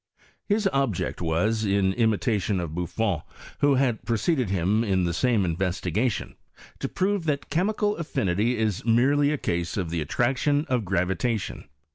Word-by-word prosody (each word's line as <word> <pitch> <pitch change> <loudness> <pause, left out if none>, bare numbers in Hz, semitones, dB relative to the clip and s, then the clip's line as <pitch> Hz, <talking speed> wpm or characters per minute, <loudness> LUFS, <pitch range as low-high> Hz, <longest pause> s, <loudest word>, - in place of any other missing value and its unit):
His 205 -1 +2
obj 135 -9 +1
eel - - -2
was, 95 +7 0
in 100 -2 +2
imiutioa 110 -3 +1
of 85 -3 -4
BuBbn, 90 +1 -1 0.4
who 145 -1 +4
had 130 -4 +1
preceded 120 - 0
him 100 +4 +1
in 95 -4 +1
the 85 - 0
Bame 105 -10 +2
iDreetigatioD, 100 +5 -1 0.5
to - - -3
prove 195 -2 0
that 145 -3 -2
chemical 205 +5 +1
affinity 120 - 0
is 110 -4 -1
merely 135 +5 +3
a 150 - 0
case 85 -7 -2
of 90 -5 -2
the 85 -2 -1
attractioa 135 - +1
of 125 -4 -1
gravitation. 95 +4 -1
110 Hz, 150 wpm, -25 LUFS, 95-135 Hz, 0.5 s, who